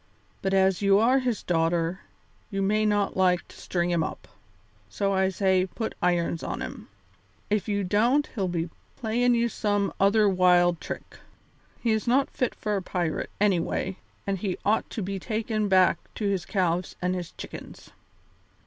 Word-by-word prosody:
But 195 0 0
as 190 0 +3
you 200 -1 +5
are 245 +5 +4
his 245 -5 -2
daughter, 165 +1 +1 0.5
you 195 -2 -1
may 215 +2 +2
not 205 -1 +1
like 180 -2 +2
to - - -14
string 175 -1 -1
him 170 -2 +2
up, - - -6 0.6
so 200 -1 0
I 190 0 +2
say 190 -1 +2
put 220 +4 -4
irons 175 -2 +1
on - - -4
him. - - -7 0.6
If 210 0 +1
you 205 -1 0
don't 235 +10 +3
he'll 195 -6 -1
be 170 -1 -2 0.2
playin' 240 +1 +1
you 235 0 +2
some 205 -3 0
other 205 +2 +4
wild 180 -2 +4
trick. - - -7 0.6
He 230 - 0
is 220 +2 0
not 265 +3 +3
fit 255 - -1
for 210 -1 -2
a 195 - -1
pirate, 175 -3 -2
anyway, 190 -1 +1 0.3
and 195 -1 -1
he 190 -1 -2
ought 215 +2 +2
to 215 - -4
be 195 +1 -3
taken 215 0 -1
back 185 -2 +4 0.2
to 215 - -3
his 190 -3 -1
calves 180 -3 0
and 180 0 0
his 180 -2 -4
chickens." - - -10
195 Hz, 170 wpm, -26 LUFS, 180-215 Hz, 0.6 s, you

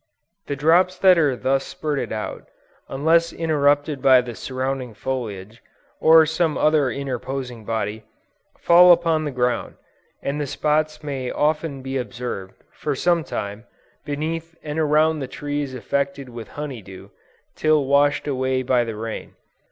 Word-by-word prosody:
The 140 - -2
drops 175 +6 +3
that 185 -2 +5
are 145 -5 +2
thus 135 +2 0
spurted 145 -7 -3
out, 110 -1 -5 0.4
unless 165 +5 +2
interrupted 145 -3 +1
by 130 -2 +6
the 120 -1 -7
surrounding 130 -1 -4
foliage, 110 -4 -5 0.4
or 160 0 +7
some 160 0 0
other 150 -3 +3
interposing 130 -2 -5
body, 110 -1 -3 0.5
fall 175 +1 +7
upon 165 -2 +3
the - - -1
ground; 125 -1 -1 0.5
and 145 +2 -2
the 145 - -2
spots 155 +2 0
may 135 -4 -4
often 150 -2 -1
be 135 0 -3
observed, 115 -5 -6
for 145 -2 -3
some 170 +3 +2
time, 105 -3 -5 0.4
beneath 160 +3 -4
and 150 +1 -4
around 155 +1 +3
the 135 - -4
trees 145 0 -4
affected 140 +1 -2
with 115 -3 -8
honey 145 -6 -5
dew, 95 -1 -12 0.4
till 155 -2 +2
washed 145 +2 +2
away 130 -1 0
by 125 -1 +2
the 115 -2 -5
rain. 110 +1 -6
140 Hz, 145 wpm, -22 LUFS, 125-155 Hz, 0.5 s, or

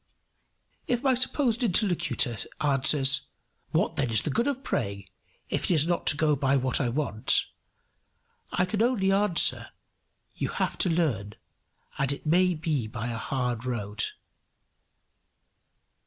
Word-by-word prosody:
If 245 +1 0
my 265 -2 +3
supposed 250 -1 +1
interlocutor 175 - 0 0.2
answers, 140 -1 +3 0.4
"What - - 0
then 130 - 0
is 110 -3 +2
the 150 - -2
good 235 - 0
of 275 -1 -2
praying, 100 0 -3 0.4
if - - -2
it - - +1
is 155 -1 +4
not 175 0 -1
to 145 - +4
go 155 -1 +2
by 140 0 +1
what 130 +1 0
I 125 - 0
want?" 120 -4 +1 1.1
I 180 - +1
can 205 +3 -2
only 225 -5 +2
answer, 195 -3 +3 0.6
"You - - -3
have - - -2
to 185 - +2
learn, 130 - -1 0.6
and 140 0 +1
it 140 - -6
may 180 +3 +3
be 155 -7 -2
by 115 +2 -5
a 115 - -4
hard 125 -2 -2
road." 110 -3 -3
150 Hz, 140 wpm, -27 LUFS, 125-185 Hz, 1.1 s, is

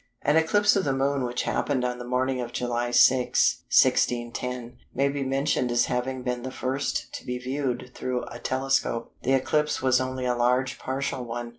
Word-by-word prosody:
An 145 - +3
eclipse 205 +7 +4
of 195 - +2
the 135 - 0
Moon 135 0 0
which 125 0 -2
happened 130 -3 0
on 125 0 -2
the 120 - -7
morning 130 +1 0
of 120 -1 -5
July 120 0 -2
6, 125 +1 +4
1610, 120 0 +1 0.2
may 140 +2 +2
be 140 0 -2
mentioned 135 -1 0
as 120 - +3
having 125 +1 -2
been 125 -1 -2
the 130 - -5
first 130 +2 -3
to - - -6
be 125 0 -3
viewed 125 -1 -3
through 125 -1 -3
a 120 - -9
telescope. 130 -3 -1
The 135 - +1
eclipse 150 +3 +1
was 130 -1 +3
only 130 0 -3
a 125 - +2
large 125 +2 +1
partial 130 -1 -3
one. 120 0 -5
130 Hz, 185 wpm, -26 LUFS, 125-135 Hz, 0.2 s, eclipse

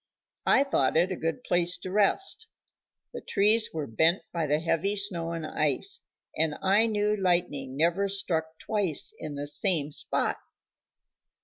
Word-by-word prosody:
I 275 - +5
thought 160 - +1
it 175 +3 +2
a - - -1
good 165 +9 -3
place 175 0 +2
to 185 - -8
rest; 215 - +1 0.7
the - - -6
trees 215 +3 +3
were 155 -2 -4
bent 160 - +1
by 165 -3 -1
the 150 +1 +1
heavy 170 +5 0
snow 180 -5 +1
and 165 -2 -4
ice, 150 -3 0 0.3
and 155 -1 0
I 200 +4 +4
knew 210 -1 0
lightning 170 -9 -1
never 170 +6 +2
struck 160 -5 -2
twice 200 -7 0
in 150 -2 -6
the 145 0 -4
same 150 -1 0
spot. - - -2
170 Hz, 150 wpm, -27 LUFS, 155-200 Hz, 0.7 s, I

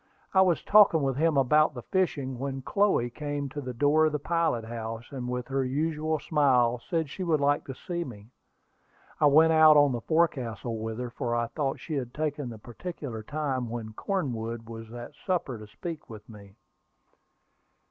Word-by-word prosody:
I 190 - +6
was 180 -3 +2
talking 200 -7 +6
with 135 -1 0
him 160 -1 +2
about 150 +3 +4
the 120 - -7
fishing, 140 -9 -1
when 135 0 -4
Chloe 195 -10 +2
came 145 +1 -4
to 145 +2 -6
the 130 -2 -5
door 145 +5 +4
of - - -1
the - - +1
pilot 165 -6 0
house, 115 0 -6
and 125 -3 -5
with 125 0 -3
her 135 0 0
usual 155 +4 -1
smile 130 -6 +2
said 165 -3 0
she 185 +7 -6
would 165 -4 +2
like 145 +1 +1
to 135 - -7
see 170 +5 -4
me. 110 -5 -11 0.9
I 150 - +5
went 160 +3 +6
out 155 -1 +7
on 145 -1 +5
the 120 -2 -3
forecastle 125 -8 0
with 110 0 -4
her, 125 -1 -4
for 120 0 -2
I 120 0 +1
thought 140 -2 -2
she 160 - -6
had 125 -4 -3
taken 150 -3 -2
the 115 - -8
particular 120 0 -7
time 135 -1 -2
when 115 -2 -5
Cornwood 115 - -3
was 115 -1 -9
at 120 0 -8
supper 170 - -2
to 105 - -10
speak 160 - -7
with 110 -2 -11
me. 100 -3 -14
135 Hz, 190 wpm, -28 LUFS, 120-155 Hz, 0.9 s, out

